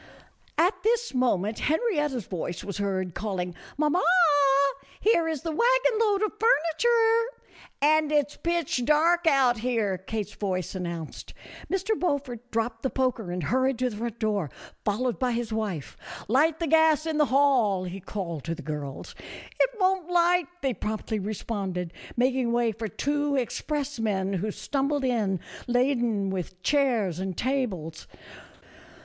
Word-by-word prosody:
At 350 +6 +2
this 470 +2 +1
moment 220 -5 +1
Henrietta's 295 - 0
voice 175 -1 -4
was 200 0 -5
heard 190 -3 -1
call 200 -1 -3
ing 180 0 -3
" - - -20
Mamma, 305 +4 +2 1.0
here 370 -7 +3
is 315 -2 -3
the 330 - -2
wagon 485 +5 +3
load 420 -2 +2
of 430 - +1
furniture." 455 +4 +3 0.5
"And 310 0 +4
it's 295 -1 +1
pitch 335 -7 -1
dark 330 +5 +3
out 260 -6 +4
here," 220 -6 0
Kate's 210 +2 -4
voice 185 -3 -3
an 185 -2 -4
nounced. 170 -3 -6 0.4
Mr. 385 +3 -1
Beaufort 265 -8 -2
dropped 225 0 -2
the 265 - 0
poker 255 -8 -1
and 175 -1 -3
hurried 260 - +1
to 250 0 0
the 210 - -7
front 235 0 -4
door, 205 -8 -1 0.3
followed 235 +4 -1
by 250 -2 +1
his 230 -1 -2
wife. 205 -10 -3 0.2
" - - -10
Light 300 +7 +3
the 335 - -1
gas 320 0 +4
in 315 -2 -1
the 300 - +5
hall," 255 -9 +3
he 185 +1 -6
called 175 -6 -5
to 165 +1 -2
the - - -10
girls. 145 -3 -6 0.3
" - - -17
It - - +4
won't 370 -2 +1
light," 350 -1 +3 0.2
they 265 -2 +1
promptly 215 0 -3
responded, 195 -4 -4 0.2
mak 250 +2 +3
ing 250 -2 0
way 235 -1 +2
for 220 +1 -5
two 290 - -1
expressmen 235 -7 -1
who 210 +5 -2
stumbled 275 +5 -1
in, 215 -7 0 0.3
laden 240 -5 +1
with 185 -1 -5
chairs 235 - +1
and 190 -2 -4
tables. 210 - -2
245 Hz, 155 wpm, -27 LUFS, 200-305 Hz, 1.0 s, the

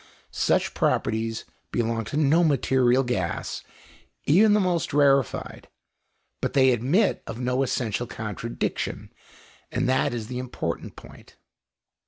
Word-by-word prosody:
Such - - +1
properties 110 0 0 0.3
belong 115 -1 -1
to 140 - -4
no 155 +3 +4
material 130 -3 +3
gas, 95 -9 -3 0.6
even 205 +8 +5
the 210 - +4
most 180 -6 0
rarefied, 140 -3 +1 0.7
but - - -2
they 130 -2 +5
admit 135 - +2
of 115 - -6
no 125 +1 0
essential 120 -3 -1
contradiction, 110 +2 -4 0.6
and 130 - 0
that 130 +1 +2
is 120 -2 -4
the 125 +2 -5
important 125 -1 -5
point. - - -15
125 Hz, 120 wpm, -25 LUFS, 115-140 Hz, 0.7 s, even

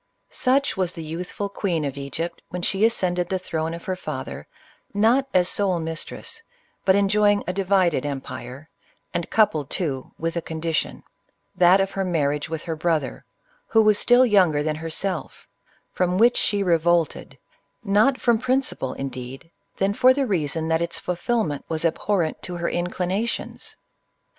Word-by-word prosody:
Such 275 +2 +1
was 185 -2 -1
the 165 - -7
youthful 175 +5 -4
queen 180 -6 -2
of 140 -1 -3
Egypt 155 +5 -5
when 180 -1 -5
she 195 +3 +1
ascended 180 -6 +1
the 190 - 0
throne 165 -2 -3
of 170 - -10
her 185 - -1
father, 150 -7 -6 0.5
not 235 +6 +3
as 180 -1 +3
sole 190 -4 +1
mistress, 165 - -5 0.4
but 190 - +5
enjoying 205 +1 +3
a 180 - -2
divided 185 -6 +2
empire, 135 0 -6 0.5
and 170 -1 -2
coupled, 155 -10 +2
too, 140 -8 -3
with 165 +1 -2
a 170 - -1
condition, 160 0 -3 0.3
— - - -45
that 180 +3 +7
of 195 0 0
her 195 - -2
marriage 150 -5 0
with 160 -1 -4
her 165 -2 -3
brother, 155 -4 -1 0.4
who 225 -1 +4
was 215 -1 +4
still 245 +1 +5
younger 180 -10 +4
than 155 0 -1
herself, 165 +4 -4 0.2
— - - -37
from 180 0 +1
which 235 +4 +5
she 200 -1 +1
revolted, 170 -2 +1 0.5
less 215 +7 +4
from 235 -2 +3
principle, 255 - 0
indeed, 135 +3 -7 0.3
than 195 +1 +1
for 255 +3 +5
the 275 -1 +1
rea 180 - 0
son 160 +2 -2
that 160 0 +1
its 170 0 -2
fulfilment 180 - -1
was 160 0 -1
abhorrent 165 0 0
to 180 - -6
her 170 0 -2
inclina 180 +5 -1
tions. - - -6
175 Hz, 165 wpm, -24 LUFS, 160-200 Hz, 0.5 s, that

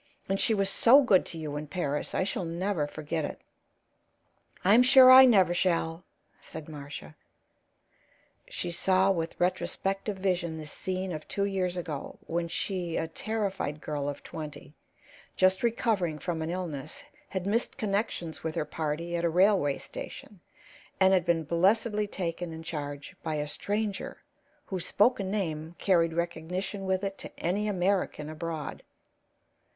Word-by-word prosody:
And 195 0 0
she 225 - +3
was 195 -1 +2
so 245 +8 +6
good 195 -8 +4
to 165 - -4
you 150 -2 -5
in 150 +1 -5
Paris. 150 -4 -2
I - - +2
shall 190 -1 -2
never 170 -1 -1
forget 155 +1 -3
it." - - -5 1.3
"I'm 210 +6 +7
sure 255 0 +9
I 260 +1 +11
never 190 -8 +5
shall," 170 -2 0 0.4
said 160 -1 -9
Marcia. 145 - -8 1.3
She 175 - -4
saw 190 +2 +3
with 165 -3 -3
retrospective 195 +2 -1
vision 175 -4 -1
the 155 - -7
scene 185 +4 -3
of 155 -2 -6
two 200 - 0
years 185 -2 -1
ago, 160 -5 -5
when 170 +1 -2
she, 175 -1 -2
a 160 - -1
terrified 195 -4 -3
girl 145 -2 -3
of 145 - -7
twenty, 150 -2 -8 0.6
just 185 0 +3
recovering 220 -8 0
from 165 0 -3
an 160 - -2
illness, 175 - -5 0.3
had 190 -2 -3
missed 220 +4 0
connections 200 -7 -2
with 160 0 -3
her 160 - -1
party 160 +2 -3
at 170 - -1
a 170 - +3
railway 180 -5 +3
station, 205 - -9 0.6
and 190 0 +5
had 180 -3 +3
been 165 -1 +2
blessedly 205 +6 +2
taken 175 -3 -4
in 160 0 -8
charge 145 -3 -6
by 155 - -2
a 150 0 -2
stranger 205 +5 -3 0.4
whose 185 -3 -4
spoken 205 -3 +2
name 165 -5 -3
carried 170 -4 +2
recognition 175 +4 -3
with 190 0 0
it 195 0 -3
to - - -7
any 200 +5 0
American 185 -5 0
abroad. 155 -1 -5
175 Hz, 150 wpm, -29 LUFS, 160-195 Hz, 1.3 s, I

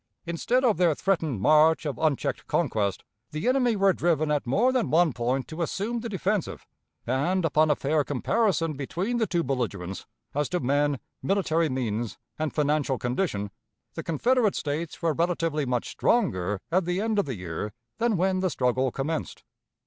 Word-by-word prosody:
Instead 230 +10 0
of 225 -4 +3
their 170 -4 +3
threatened 160 - 0
march 155 +8 +4
of 145 - -3
unchecked 155 -4 0
conquest, 100 -3 0 0.3
the 155 +7 -3
enemy 250 -3 +3
were 195 -1 +4
driven 155 -4 +1
at 145 -4 0
more 230 - +3
than 255 -4 0
one 165 -2 +3
point 125 +3 -1
to 160 +2 -6
assume 210 +8 -2
the 230 0 -5
defensive; 200 -1 -2 0.4
and, 165 +9 +1
upon 155 0 +3
a 150 - +4
fair 150 +2 +1
comparison 165 - 0
between 175 - -2
the 225 -2 +1
two 170 -2 0
belligerents, 115 -9 -3 0.3
as 145 0 0
to 180 - 0
men, 145 +1 +1 0.2
military 170 -5 +1
means, 120 -4 -2 0.2
and 155 -1 -1
financial 145 -3 +1
condition, 120 - -2 0.4
the - - -4
Confederate 225 - +2
States 155 +3 -4
were 165 -2 +2
relatively 165 -3 0
much 125 -1 -1
stronger 105 - +1
at 185 +1 +2
the 180 +1 -1
end 220 0 +1
of 200 - +1
the 135 -4 -4
year 90 +2 -5 0.3
than 230 -3 +2
when 185 +1 +1
the 185 0 +1
struggle 130 -2 +1
commenced. 150 +5 -3
155 Hz, 170 wpm, -26 LUFS, 135-190 Hz, 0.4 s, march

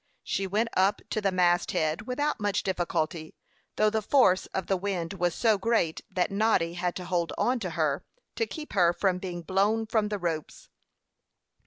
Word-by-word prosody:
She 195 - -1
went 215 +4 0
up 195 +2 +2
to 215 - 0
the 195 -1 +1
mast 175 -1 +2
head 155 +7 -1
without 290 +3 -1
much 205 -1 0
difficulty, 170 -3 -2 0.4
though 215 0 +3
the 220 0 0
force 205 -5 +3
of 190 - -3
the 195 - +1
wind 185 -2 -3
was 175 -3 0
so 220 -4 +3
great 195 -7 +1
that 185 -1 0
Noddy 200 -5 +2
had 175 0 -2
to 180 - -5
hold 175 -2 -1
on 250 0 +1
to 190 -5 -3
her, 150 -3 +1 0.3
to 455 - 0
keep 310 -2 -8
her 175 -3 +4
from 185 -1 0
being 175 -2 -5
blown 205 +5 +1
from 220 -1 +1
the 210 0 -2
ropes. 165 -4 -4
190 Hz, 185 wpm, -28 LUFS, 175-215 Hz, 0.4 s, her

